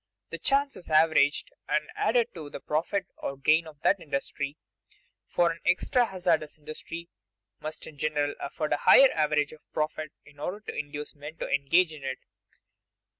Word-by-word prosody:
The 165 - -5
chance 275 - +2
is 175 - -9
averaged 155 -2 +4 0.2
and 150 +1 +2
added 235 0 +2
to 155 -4 -8
the - - -7
profit 165 +6 -1
or 135 - -4
gain 155 +4 +3
of 150 -2 -13
that 195 - +3
industry, 140 -1 -3 0.7
for 175 -1 +2
an 165 - -7
extra 245 +6 +3
hazardous 175 -6 0
industry 160 +2 -8 0.5
must 155 0 -5
in 145 - -12
general 150 -1 0
afford 150 +2 -2
a - - +2
higher 270 -1 +7
average 150 -2 +1
of 155 - -18
profit 155 0 -2
in 145 0 -18
order 180 +7 -3
to - - -7
induce 150 0 -5
men 150 +2 -9
to - - -3
engage 160 +5 +3
in 150 -3 -11
it. 130 -1 -3
155 Hz, 170 wpm, -28 LUFS, 145-170 Hz, 0.7 s, higher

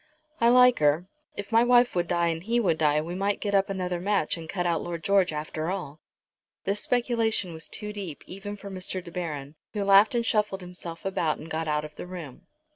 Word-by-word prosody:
I 235 - +5
like 250 0 +6
her. 150 +3 +3 0.3
If 205 +2 -6
my 225 +1 +5
wife 245 0 +5
would 175 -1 +1
die 170 -1 +1
and 165 0 -2
he 230 +6 +1
would 180 -8 +1
die, 150 -1 +3
we 165 +3 -5
might 200 +2 0
get 205 -1 -2
up 195 0 +3
another 180 -2 -2
match 200 -4 +1
and 165 -1 -9
cut 180 0 -2
out 170 -2 +1
Lord 170 -2 -5
George 195 -3 +3
after 155 +1 -3
all." 175 -6 -4 0.6
This 200 +2 -1
speculation 230 -7 0
was 160 - -6
too 210 -1 -5
deep 190 -8 -7
even 200 +2 -7
for 200 -1 -9
Mr. 185 0 -4
De 170 - -10
Baron, 150 -5 -5 0.2
who 205 -2 -1
laughed 200 +4 +6
and 235 -1 +1
shuffled 210 -3 +1
himself 180 -1 -7
about, 170 -5 0
and 160 - -10
got 160 0 -2
out 150 0 0
of 150 - -12
the - - -7
room. 175 -2 -9
180 Hz, 220 wpm, -27 LUFS, 165-205 Hz, 0.6 s, like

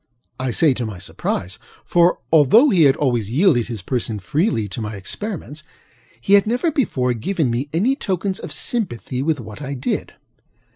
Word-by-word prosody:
I 130 0 -1
say 145 +4 +3
to 125 -2 -3
my 105 -4 -7
surprise, 90 +1 -4 0.3
for, 175 0 +3 0.2
although 190 - +6
he 175 -6 +5
had 135 -1 +5
always 120 -8 0
yielded 135 - +3
his 110 -7 -6
person 115 -1 -2
freely 145 - 0
to 115 - -6
my 110 0 -4
experiments, 155 - -6 0.6
he 155 +12 0
had 200 +1 +6
never 250 +9 +1
before 130 - 0
given 135 - -1
me 125 +5 -2
any 215 +12 +1
tokens 195 - -2
of - - -7
sympathy 130 - -1
with 150 0 0
what 110 -1 -9
I 140 0 -4
did. 125 - -3
140 Hz, 175 wpm, -20 LUFS, 120-190 Hz, 0.6 s, although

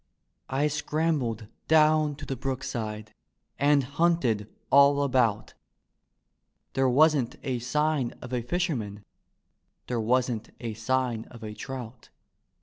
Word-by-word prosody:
I 135 +3 +1
scrambled 150 -6 -1 0.2
down 155 -1 +4
to 145 0 -8
the 135 - -3
brookside 110 -5 -4 0.5
and 145 0 +4
hunted 135 -7 +1 0.2
all 140 0 +6
about; 125 -6 +1 1.2
There 135 0 +2
wasn't 145 -2 +3
a 130 -2 -2
sign 145 +1 0
of 125 0 -8
a 125 - 0
fi^ennan; 120 - -2 0.8
there 120 -2 -2
wasn't 120 -1 0
a 115 -2 -4
sign 120 0 -1
of 115 -2 -13
a 105 -1 -6
trout. 125 -1 -8
130 Hz, 115 wpm, -27 LUFS, 115-145 Hz, 1.2 s, all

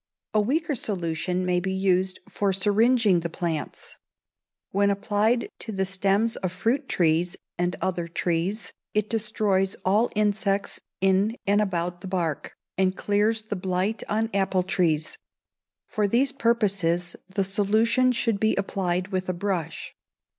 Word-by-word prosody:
A 215 - +4
weaker 300 +8 0
solution 180 -5 -1
may 180 -1 +2
be 190 +1 -2
used 190 -1 +1
for 200 -1 0
syringing 205 +1 +3
the 170 0 -4
plants. 165 -2 -4 0.7
When 200 +1 +2
applied 210 +3 +1
to 225 - -4
the 190 -2 0
stems 195 +4 +2
of 185 - -3
fruit 240 +9 -1
trees, 170 +1 +1 0.2
and 175 0 0
other 175 -2 -1
trees, 175 +5 -2 0.2
it 210 0 0
destroys 210 -3 +1
all 210 +5 +3
insects 205 -1 0 0.2
in 195 +3 +2
and 205 +1 +3
about 175 -3 -2
the 195 - -7
bark, 175 -5 -2 0.2
and 185 0 +2
clears 215 +2 +1
the 215 -1 -4
blight 185 +3 -1
on 220 +2 0
apple 190 -2 +1
trees. 165 -4 0 0.7
For 210 -1 0
these 250 +7 +2
purposes 200 -9 +1
the 195 +1 0
solution 220 +6 +3
should 230 -4 0
be 220 +1 +2
applied 185 -2 -1
with 185 -2 -2
a - - +1
brush. 175 -4 -3
195 Hz, 140 wpm, -25 LUFS, 180-215 Hz, 0.7 s, A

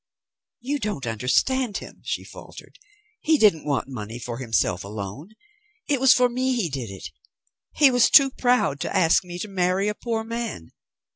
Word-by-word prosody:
"You 285 +4 -2
don't 205 - -4
understand 195 - 0
him," - - -11
she - - -3
faltered. - - -13 0.4
"He 315 0 +2
didn't 205 - +3
want 140 -2 -1
money 115 -3 -7
for 120 0 -6
himself 110 -7 0
alone. 105 - -8 0.5
It 285 -4 +1
was 265 - +6
for 250 0 +5
me 255 +1 -1
he 210 -9 -1
did 130 -5 -5
it. 95 -2 -9 0.6
He 285 -3 +5
was 245 -1 +4
too 275 -2 +6
proud 245 - +1
to - - -4
ask 175 +1 +3
me 175 -1 -8
to 195 - -5
marry 185 0 0
a - - -2
poor 225 0 -3
man. 230 - -6
190 Hz, 170 wpm, -24 LUFS, -, 0.6 s, was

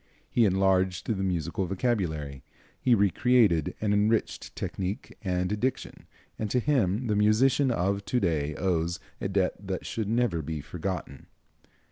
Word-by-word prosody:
He 120 - +4
enlarged 95 -2 +2
the 115 - 0
musical 90 0 -1
vocabulary, 85 - -2 0.4
he 125 - +4
re 100 -3 +3
created 110 -12 +3
and 105 -1 +1
enriched 105 +2 0
technique 95 +2 -4
and 90 +2 -1
diction, 130 +2 -3 0.3
and 110 - -2
to 125 - +2
him 120 -5 +1
the 105 -3 0
musician 115 +7 +3
of 100 -2 0
to 125 - +1
day 75 -6 0
owes 85 -2 0 0.2
a - - 0
debt 95 -1 +1
that 95 -2 -5
should 110 -3 -3
never 115 -8 +1
be 80 +1 -4
forgotten. 90 +3 -5
95 Hz, 145 wpm, -28 LUFS, 90-110 Hz, 0.4 s, He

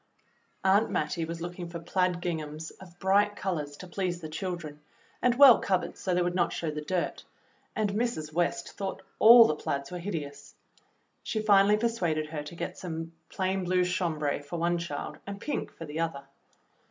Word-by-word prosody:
Aunt 195 +4 +4
Mattie 165 -2 -1
was 165 +1 -6
looking 175 0 -5
for 170 - -6
plaid 180 +1 0
ginghams 155 -2 -4
of 175 -2 -14
bright 205 +3 +3
colors 150 -8 -3
to 185 - -9
please 180 -1 -2
the 160 -2 -7
children, 160 -3 -5 0.4
and 245 -1 +3
well 265 -3 +9
covered 185 -2 -1
so 185 -2 -1
they 180 - +2
would 175 0 -1
not 175 -1 +1
show 160 -2 -2
the 150 0 -5
dirt, 180 +3 -2 0.5
and 210 -2 0
Mrs. 205 -9 -2
West 175 +1 -1
thought 195 -1 -5 0.2
all 230 +1 +10
the 155 - +1
plaids 140 0 -3
were 180 - -4
hideous. 150 -6 -6 0.7
She 220 - -2
finally 205 -1 +5
per 225 - -1
suaded 165 -9 -1
her 155 -2 -4
to 150 +3 -9
get - - -5
some 165 -2 -5 0.2
plain 190 0 -1
blue 180 0 +2
chambray 160 -6 -1
for 145 +4 -6
one 170 +1 +1
child 170 -4 -5
and 200 0 -6
pink 295 - -3
for 165 - -9
the 150 +1 -5
other. 160 -4 -2
175 Hz, 185 wpm, -29 LUFS, 160-195 Hz, 0.7 s, all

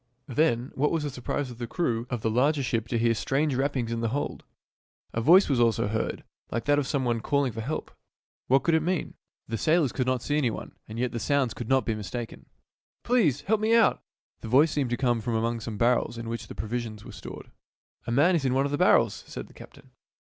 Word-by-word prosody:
Then, 130 -3 +1
what 150 +3 +1
was 165 -2 -1
the 145 - -3
surprise 130 +1 -3
of 120 - -11
the 120 - -4
crew 120 -5 -1
of 120 -3 -3
the 110 - +2
larger 140 +5 +2
ship 115 -2 -1
to 115 - -1
hear 115 0 +3
strange 140 +6 0
rappings 130 -3 -1
in 115 - -2
the 115 - 0
hold! 140 +5 -3 0.7
A 115 - -1
voice 175 - +6
also 120 -5 +2
was 105 - -2
heard, 110 0 -2 0.3
like 115 0 -3
that 145 0 +3
of 140 - -2
some 140 -3 0
one 120 -1 +1
calling 140 -2 +1
for 115 +1 -5
help. - - -4 0.6
What 135 +1 +4
could 170 - +2
it 160 - +4
mean? 175 +2 -1 0.3
The 115 -1 -3
sailors 155 -5 +3
could 130 -2 -2
not 130 -2 0
see 150 +1 +1
any 130 -5 +2
one, - - -6 0.2
and 110 - -8
yet 125 0 0
the 115 - -3
sounds 140 -2 +1
could 120 - -7
not 135 -1 +3
be 115 - 0
mistaken. 110 +3 -6 0.3
" - - -62
Please 185 - +2
help 215 +1 +1
me 220 +1 +3
out! 230 - +4 0.2
" - - -60
The - - -7
voice 140 +7 +5
seemed 140 -4 0
to 120 - -1
come 120 -3 +1
from 115 +1 -2
among 115 +1 0
some 110 -1 -6
barrels 120 +1 +1
in 115 0 -6
which 115 0 -5
pro 110 - -5
visions 115 -2 -4
were - - -9
stored. - - -10 0.3
" - - -37
A - - -1
man 150 +9 +4
is 160 - 0
in 130 -1 +1
one 135 +1 +2
of 140 - -2
the 145 - -1
barrels," - - +3
said - - -7
the - - -18
captain. - - -15
125 Hz, 250 wpm, -27 LUFS, 115-145 Hz, 0.7 s, voice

